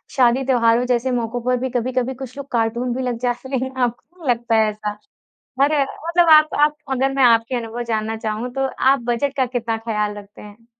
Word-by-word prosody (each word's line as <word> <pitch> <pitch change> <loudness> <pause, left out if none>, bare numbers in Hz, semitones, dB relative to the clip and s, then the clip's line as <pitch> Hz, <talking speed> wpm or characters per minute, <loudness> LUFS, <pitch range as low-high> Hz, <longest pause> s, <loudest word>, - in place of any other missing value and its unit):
शादी, 255 0 +3
त्योहारों 240 -2 +3
जैसे 250 +1 0
मौकों 240 0 -2
पर 250 +1 +1
भी 260 +1 -2
कभी-कभी 255 +1 -1
कुछ 265 +1 -9
लोग 280 - -7
कार्टून 235 +1 0
भी 260 - -2
लग 245 -2 -2
जाते 245 +1 -3
है 260 +1 -2
आपको 245 +9 -4
नहीं - - -1
लगता 235 -1 +1
ऐसा? 210 0 -5 0.6
हर 285 +2 +4
मतलब 335 +5 0
आप 310 0 +6
आप 295 0 +3 0.2
अगर 265 +1 +1
मैं 270 - +2
आपके 230 +1 +4
अनुभव 235 0 -4
जानना 220 -1 -2
चाहूँ, 220 +2 -4
तो 270 +1 0
आप 270 0 +3
बजट 250 +4 0
का 260 -2 +2
कितना 235 -2 -2
ख़्याल 210 -2 -2
रखते 205 0 -13
हैं? 210 +2 -14
245 Hz, 200 wpm, -20 LUFS, 230-265 Hz, 0.6 s, आप